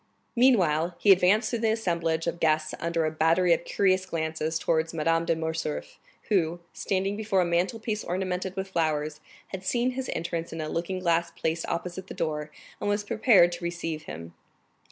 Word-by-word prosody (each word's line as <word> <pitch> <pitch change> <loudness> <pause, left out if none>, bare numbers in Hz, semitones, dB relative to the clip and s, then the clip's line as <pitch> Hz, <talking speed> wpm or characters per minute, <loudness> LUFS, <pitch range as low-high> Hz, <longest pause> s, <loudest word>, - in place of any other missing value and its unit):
30301m - - -26
Meanwhile 180 -10 +3
he 205 - +5
advanced 195 +4 +4
through 235 - -1
the 225 0 +2
assemblage 170 -6 -1
of 170 - -2
guests 155 -1 +1
under 170 -1 0
a 155 - 0
battery 165 +3 +3
of 165 +1 -1
curious 185 -1 +2
glances 160 -1 -2
towards 160 0 0
Madame 165 +1 +1
de 165 - +2
Morcerf, 160 -1 -4 0.3
who, 175 -4 +1
standing 195 +1 -1
before 210 -3 +1
a - - +2
mantle 175 +6 0
piece 215 -1 -3
ornamented 185 +1 -2
with 190 0 -4
flowers, 155 -3 0 0.3
had 190 -1 -6
seen 240 +6 +1
his 255 0 -4
entrance 170 0 -3
in 165 - -6
a 155 - -3
looking 170 +4 -2
glass 170 -2 +1
placed 165 0 -2
opposite 180 +2 -4
the - - -8
door, 150 -1 -2 0.3
and - - -1
was 205 0 0
prepared 205 -5 +5
to 175 - -7
receive 170 -2 -4
him. 85 +2 -8
170 Hz, 185 wpm, -27 LUFS, 160-190 Hz, 0.3 s, he